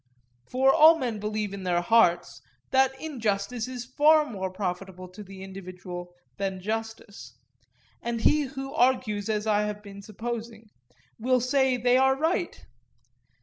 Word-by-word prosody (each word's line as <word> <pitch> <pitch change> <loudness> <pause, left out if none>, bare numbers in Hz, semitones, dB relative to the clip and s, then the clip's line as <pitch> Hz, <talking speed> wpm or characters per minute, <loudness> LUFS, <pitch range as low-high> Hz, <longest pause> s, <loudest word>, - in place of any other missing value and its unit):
For 265 +1 +3
all 320 +1 +7
men 240 -7 -3
believe 210 -1 -3
in 200 - -6
their 175 -2 0
hearts 175 -4 +2 0.3
that 265 0 +2
injustice 230 -5 -2
is 250 -2 -6
far 300 +4 +4
more 190 -8 -4
profitable 185 -1 -5
to 190 +4 -11
the 195 -1 -10
individual 180 -2 -9 0.2
than 195 -2 -3
justice, 220 +1 -6 0.6
and 235 -1 -3
he 300 +5 +3
who 270 +1 -7
argues 230 -5 +1
as 210 -1 -1
I 210 -1 +2
have 210 0 -5
been 200 -1 -10
supposing, 225 +1 -7 0.5
will 255 +2 +2
say 260 +1 +2
that 240 - -11
they 250 0 +4
are 265 0 +4
right. 335 +5 -2
220 Hz, 150 wpm, -26 LUFS, 195-255 Hz, 0.6 s, all